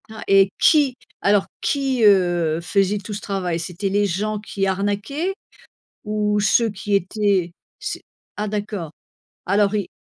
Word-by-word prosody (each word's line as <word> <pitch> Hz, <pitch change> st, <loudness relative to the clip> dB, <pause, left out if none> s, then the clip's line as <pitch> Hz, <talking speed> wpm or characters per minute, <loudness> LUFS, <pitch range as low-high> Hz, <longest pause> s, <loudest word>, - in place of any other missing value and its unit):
Ah, 220 Hz, 0 st, -8 dB
et 195 Hz, 0 st, +5 dB
qui 290 Hz, -5 st, +4 dB, 0.3 s
alors 200 Hz, -1 st, +3 dB, 0.2 s
qui, 270 Hz, -4 st, 0 dB
heu, 175 Hz, -5 st, +3 dB
faisait 195 Hz, +3 st, +1 dB
tout 205 Hz, +1 st, -7 dB
ce 205 Hz, -, -5 dB
travail? 180 Hz, -4 st, -2 dB
C'était 180 Hz, +4 st, -3 dB
les 205 Hz, +1 st, +2 dB
gens 210 Hz, +4 st, -2 dB
qui 200 Hz, -1 st, -3 dB
arnaquaient 205 Hz, -, -1 dB, 0.7 s
ou 210 Hz, -1 st, 0 dB
ceux 225 Hz, +3 st, +3 dB
qui 205 Hz, 0 st, -2 dB
étaient 195 Hz, -2 st, 0 dB, 0.3 s
c'est -, -, -5 dB, 0.4 s
ah 210 Hz, +1 st, -2 dB
d'accord! 205 Hz, -5 st, -4 dB, 0.6 s
Alors 200 Hz, +2 st, +2 dB
ils 205 Hz, -, -1 dB
205 Hz, 145 wpm, -21 LUFS, 190-210 Hz, 0.7 s, et